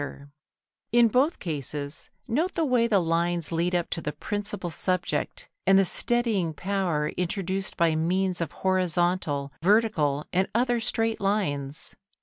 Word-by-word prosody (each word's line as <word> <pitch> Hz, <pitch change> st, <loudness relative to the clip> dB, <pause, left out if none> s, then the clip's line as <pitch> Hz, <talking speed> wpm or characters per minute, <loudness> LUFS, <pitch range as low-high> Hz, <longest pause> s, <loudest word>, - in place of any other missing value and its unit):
Photo 145 Hz, -2 st, -4 dB
Anderson] 140 Hz, 0 st, -15 dB, 0.6 s
In 240 Hz, -1 st, +6 dB
both 265 Hz, -, +2 dB
cases 145 Hz, -2 st, -5 dB, 0.2 s
note 315 Hz, +11 st, 0 dB
the 330 Hz, -, +1 dB
way 245 Hz, -4 st, +3 dB
the 215 Hz, -4 st, +3 dB
lines 170 Hz, 0 st, 0 dB
lead 170 Hz, +2 st, 0 dB
up 175 Hz, -1 st, -1 dB
to 165 Hz, -, -2 dB
the 150 Hz, -, -3 dB
principal 205 Hz, +2 st, -4 dB
subject, 185 Hz, -, -2 dB, 0.2 s
and 195 Hz, 0 st, +7 dB
the 195 Hz, -, +5 dB
steadying 215 Hz, -7 st, +1 dB
power 180 Hz, -5 st, -1 dB
introduced 190 Hz, +2 st, -2 dB
by 165 Hz, -1 st, +3 dB
means 180 Hz, +3 st, 0 dB
of 170 Hz, -, -2 dB
horizontal, 175 Hz, -6 st, +1 dB
vertical, 165 Hz, -8 st, +2 dB
and 185 Hz, +2 st, +2 dB
other 245 Hz, 0 st, +2 dB
straight 225 Hz, -1 st, -1 dB
lines. 150 Hz, -9 st, -2 dB
185 Hz, 145 wpm, -26 LUFS, 160-215 Hz, 0.6 s, and